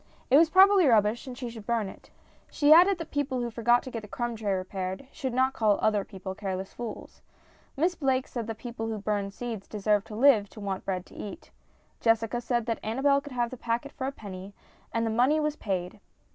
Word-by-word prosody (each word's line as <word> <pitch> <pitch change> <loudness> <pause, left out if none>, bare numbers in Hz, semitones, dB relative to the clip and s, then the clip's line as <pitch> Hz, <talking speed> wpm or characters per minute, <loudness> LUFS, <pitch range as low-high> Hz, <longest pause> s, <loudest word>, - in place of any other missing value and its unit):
It 270 - +8
was 320 +1 +6
probably 380 -1 +6
rubbish, 220 +1 +3
and 250 -1 -7
she 250 - -5
should 220 -3 -11
burn 230 -3 0
it. - - -12 0.4
She 295 0 +5
added 365 +4 +6
that 330 -2 -8
people 280 -3 -1
who 240 -1 -2
forgot 240 +2 +3
to 260 - -8
get 230 - -4
the 210 - -11
crumb 240 +2 -3
tray 215 -2 -2
repaired 190 +3 -3
should 265 -4 -4
not 260 +2 +2
call 215 -4 +2
other 215 -2 +2
people 190 -2 -7
careless 190 -1 -5
fools. 235 -3 -8 0.6
Miss 340 +5 +2
Blake 265 -5 0
said 235 -3 -5
that 225 -1 -5
people 230 -1 -5
who 220 -1 -3
burned 205 -1 -2
seeds 225 -1 -6
deserved 210 -1 0
to 215 - -8
live 225 -4 +5
to - - -12
want 195 -2 -4
bread 185 -2 -2
to - - -18
eat. 205 - -8 0.5
Jessica 225 +1 +1
said 240 -2 -1
that 230 -1 -2
Annabel 275 +5 +2
could 285 -2 -10
have 240 -1 -1
the 255 - -7
packet 235 +4 -2
for 265 -2 -4
a - - -2
penny, 200 -5 -9 0.4
and 230 0 0
the 225 - 0
money 255 +7 +3
was 300 -1 0
paid. 185 -1 -3
230 Hz, 220 wpm, -28 LUFS, 205-265 Hz, 0.6 s, It